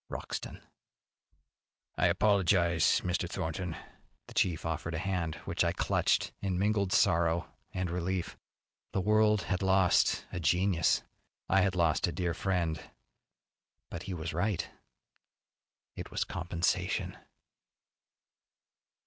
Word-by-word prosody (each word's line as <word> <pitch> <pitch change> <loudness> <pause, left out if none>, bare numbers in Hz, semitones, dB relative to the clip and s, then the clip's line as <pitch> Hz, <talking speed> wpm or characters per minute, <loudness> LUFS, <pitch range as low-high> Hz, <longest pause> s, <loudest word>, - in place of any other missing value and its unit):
Wroxton. - - -6 1.3
"I - - +3
apologize, 90 -3 +3
Mr. 90 -1 -1
Thornton." 85 0 -3 0.5
The - - -13
chief 85 -3 +1
offered 80 0 -3
a 85 +4 -3
hand 90 -5 -1
which - - 0
I - - +1
clutched - - +1
in 95 -3 -1
mingled 100 -1 +1
sorrow 85 -3 +2 0.2
and 90 -1 -2
relief. 90 +1 -2 0.6
The 95 - +1
world 105 0 +3
had 90 +2 -2
lost 95 -1 +3
a 90 - -4
genius. 90 +2 +2 0.4
I 95 - +4
had 95 -2 +1
lost 85 -2 +2
a - - -2
dear 85 +1 -1
friend. 85 -3 -1 1.1
But 85 - -5
he 90 - -3
was 80 -1 -4
right. 90 +2 -1 1.3
It - - -7
was - - -1
compensation. 85 +1 -1
90 Hz, 115 wpm, -31 LUFS, 85-95 Hz, 1.3 s, I